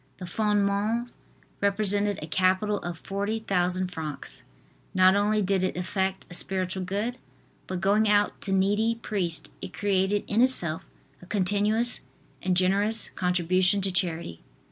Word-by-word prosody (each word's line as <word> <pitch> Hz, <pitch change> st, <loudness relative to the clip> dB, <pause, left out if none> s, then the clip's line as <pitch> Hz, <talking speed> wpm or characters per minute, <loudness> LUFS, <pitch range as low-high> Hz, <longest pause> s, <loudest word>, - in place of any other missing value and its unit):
The 185 Hz, -, -7 dB
"Fondements" 210 Hz, +4 st, 0 dB, 0.5 s
represented 200 Hz, 0 st, +2 dB
a -, -, -6 dB
capital 190 Hz, +5 st, +1 dB
of 175 Hz, -1 st, -6 dB
40,000 195 Hz, -2 st, -1 dB
francs. 155 Hz, -4 st, -6 dB, 0.5 s
Not 185 Hz, +1 st, +6 dB
only 210 Hz, +1 st, +2 dB
did 190 Hz, 0 st, +1 dB
it 185 Hz, -1 st, -1 dB
effect 190 Hz, +1 st, -2 dB
a -, -, -11 dB
spiritual 185 Hz, +1 st, 0 dB
good, 210 Hz, +7 st, -3 dB, 0.5 s
but 185 Hz, -1 st, -4 dB
going 205 Hz, +3 st, +3 dB
out 205 Hz, 0 st, +2 dB
to 195 Hz, -, -3 dB
needy 205 Hz, +4 st, +2 dB
priests 195 Hz, -7 st, -1 dB
it 190 Hz, -, -7 dB
created 200 Hz, 0 st, 0 dB
in 220 Hz, +3 st, +2 dB
itself 175 Hz, -11 st, +1 dB, 0.3 s
a 180 Hz, -, -14 dB
continuous 210 Hz, +4 st, +1 dB, 0.4 s
and 185 Hz, -1 st, +1 dB
generous 200 Hz, +4 st, +2 dB
contribution 180 Hz, +2 st, +1 dB
to 195 Hz, 0 st, 0 dB
charity. 170 Hz, -, -2 dB
195 Hz, 135 wpm, -26 LUFS, 185-210 Hz, 0.5 s, Not